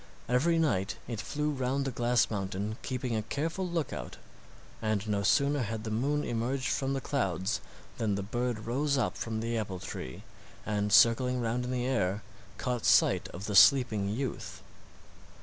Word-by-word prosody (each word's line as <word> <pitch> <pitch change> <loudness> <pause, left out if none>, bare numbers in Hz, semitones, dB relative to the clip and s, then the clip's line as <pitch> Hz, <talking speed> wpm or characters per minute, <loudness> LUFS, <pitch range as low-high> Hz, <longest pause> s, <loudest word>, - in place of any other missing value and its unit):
Every 145 +8 +3
night 105 -12 +1
it 115 -3 -4
flew 150 +4 -2
round 135 0 -1
the 135 - -1
glass 120 0 +2
mountain 100 +1 -3
keeping 125 -2 -2
a 110 - 0
careful 165 - -2
lookout, 150 - -3 0.6
and 110 -1 -1
no 105 -1 0
sooner 140 +7 +3
had 110 -1 -3
the 110 - -4
moon 140 +7 0
emerged 125 +3 -1
from 135 0 0
the 135 - -2
clouds 95 - -1 0.4
than 105 -3 +1
the 100 - -2
bird 120 +1 -2
rose 140 +4 +1
up 130 - 0
from 110 -1 -3
the 115 +1 -2
apple 100 -4 -2
tree, 65 -7 -7 0.4
and 105 -1 -1
circling 115 +5 +5
round 120 +1 -1
in 125 - -3
the 125 -1 -1
air 105 -6 0 0.3
caught 125 -3 -2
sight - - +4
of 95 +3 -8
the 105 - -3
sleeping 110 -1 +6
youth. 125 +4 -4
120 Hz, 165 wpm, -30 LUFS, 105-135 Hz, 0.6 s, sleeping